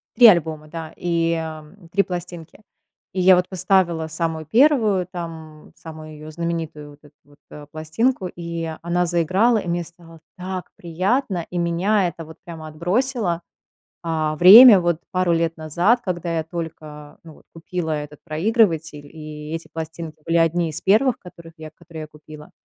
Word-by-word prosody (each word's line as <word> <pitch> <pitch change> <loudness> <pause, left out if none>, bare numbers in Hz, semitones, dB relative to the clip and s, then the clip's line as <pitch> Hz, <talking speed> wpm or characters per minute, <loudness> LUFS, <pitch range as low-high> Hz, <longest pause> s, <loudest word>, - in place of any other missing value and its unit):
3 240 -2 +9
альбома, 160 -5 +2
да, 160 0 -8
и, 170 -1 0
эм, 160 +2 -7
3 200 +3 +2
пластинки. 175 +1 -8 0.5
И 185 - -1
я 185 +1 +7
вот 180 0 0
поставила 180 -3 +1
самую 160 0 -3
1 220 - +3
там, 165 -4 -9
самую 155 -1 -11
ее 155 +1 -10
знаменитую 165 -3 -5
вот 145 - -18
эту 145 - -19
вот, 145 +1 -23
э, 150 -1 -10
пластинку, 180 +8 -1
и 170 -1 -5
она 175 +1 0
заиграла, 185 +8 +2
и 175 - -7
мне 170 0 -1
стало 165 -1 -15 0.2
так 185 0 -6
приятно, 185 +2 -1
и 180 - -5
меня 180 +4 +1
это 165 -1 -7
вот 160 +1 -13
прямо 160 -2 -9
отбросило, 180 - -1 0.6
а, 155 -2 -1
время 210 - +10
вот 175 -2 0
пару 185 -2 +1
лет 165 0 -1
назад, 170 +10 +1
когда 175 -3 -3
я 160 - -1
только, 155 -3 -8
ну, 160 -2 -13
вот - - -22
купила 165 0 -4
этот 150 -1 -5
проигрыватель, 160 -4 0
и 150 0 -9
эти 165 0 -6
пластинки 160 0 -7
были 165 0 +1
одни 165 0 +2
из 155 0 -5
первых, 225 +5 +3
которых 170 -2 -14
я 155 0 -9
которые 165 0 -11
я - - -9
купила. 150 0 -14
170 Hz, 165 wpm, -21 LUFS, 155-180 Hz, 0.6 s, время